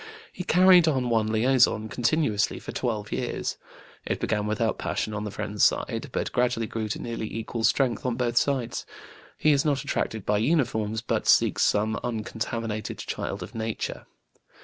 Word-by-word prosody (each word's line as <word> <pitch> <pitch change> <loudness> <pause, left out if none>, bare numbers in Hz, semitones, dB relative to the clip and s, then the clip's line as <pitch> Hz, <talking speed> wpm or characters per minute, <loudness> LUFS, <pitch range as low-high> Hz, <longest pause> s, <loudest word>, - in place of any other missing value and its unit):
He 180 - -5
carried 180 -1 +6
on 130 -5 +1
one 110 -2 +2
liaison 115 -1 +3
continuously 115 -3 +1
for - - -7
twelve 110 -5 -3
years; - - -2 0.5
it - - -2
began 105 -1 -1
without 110 +1 0
passion 110 - -2
on 105 0 -3
the - - -3
friend's 105 0 -2
side, - - +1
but - - -2
gradually 120 -2 +1
grew 110 0 -3
to 105 - -3
nearly 115 -2 -4
equal 115 +1 -4
strength 125 +2 +2
on 125 -2 -1
both 120 -1 -1
sides. 130 -2 0 0.5
He 155 - +3
is 140 -1 +3
not 140 -4 0
attracted 110 -3 -2
by 105 - +2
uniforms, 110 -5 +1
but - - -1
seeks - - +4
some 110 +2 +2
uncontaminated 110 -1 -3
child 100 -1 -4
of 100 - -10
nature. 110 -1 -4
115 Hz, 165 wpm, -26 LUFS, 110-125 Hz, 0.5 s, carried